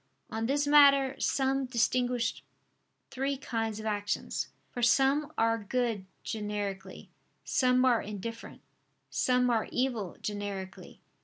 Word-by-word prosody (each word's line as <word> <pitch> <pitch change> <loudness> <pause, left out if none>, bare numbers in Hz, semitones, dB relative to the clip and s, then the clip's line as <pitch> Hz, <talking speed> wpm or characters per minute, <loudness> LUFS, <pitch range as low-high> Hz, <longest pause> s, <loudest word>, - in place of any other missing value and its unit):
On 225 +1 -2
this 285 +2 +1
matter, 280 -2 +6
some 270 0 +1
distinguished 245 -1 0 0.7
three 270 +1 -1
kinds 225 -4 -3
of 215 - -7
actions: 205 -1 -2 0.2
for 245 - -5
some 270 +5 +3
are 230 0 +2
good 230 -3 -1 0.2
generically; 205 -3 -5 0.3
some 255 0 +3
are 245 -3 +4
indifferent; 210 +3 -7 0.5
some 250 -1 +2
are 225 -2 +1
evil 240 -8 -1
generically. 200 -2 -6
235 Hz, 110 wpm, -30 LUFS, 210-265 Hz, 0.7 s, matter